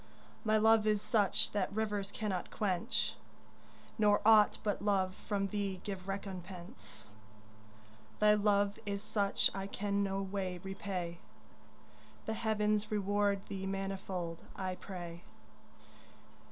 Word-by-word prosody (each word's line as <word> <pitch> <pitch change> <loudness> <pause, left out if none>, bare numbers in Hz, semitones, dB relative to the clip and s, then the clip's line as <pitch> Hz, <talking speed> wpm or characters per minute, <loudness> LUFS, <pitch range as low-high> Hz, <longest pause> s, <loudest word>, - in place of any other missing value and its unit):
My 215 -1 +3
love 220 0 +5
is 210 -1 +3
such 205 -3 +2
that 200 -2 0
rivers 205 -2 -1
cannot 200 -4 -3
quench, 210 +3 0 0.9
Nor 205 -1 +5
aught 215 -1 +7
but 205 -2 0
love 195 -2 +2
from 195 0 -2
thee 200 -2 -2
give 195 -2 -5
recompense. 180 - -7 1.1
Thy 210 0 +6
love 205 0 +2
is 200 -1 -3
such 205 -2 +1
I 195 0 -3
can 200 0 -1
no 195 -1 0
way 190 -2 -2
repay, 190 -3 -4 1.1
The 220 - -1
heavens 215 -1 +1
reward 205 -1 +1
thee 195 -1 -4
manifold, 195 -3 -3 0.2
I 185 -1 -2
pray. 175 -3 -7
200 Hz, 115 wpm, -34 LUFS, 190-210 Hz, 1.1 s, aught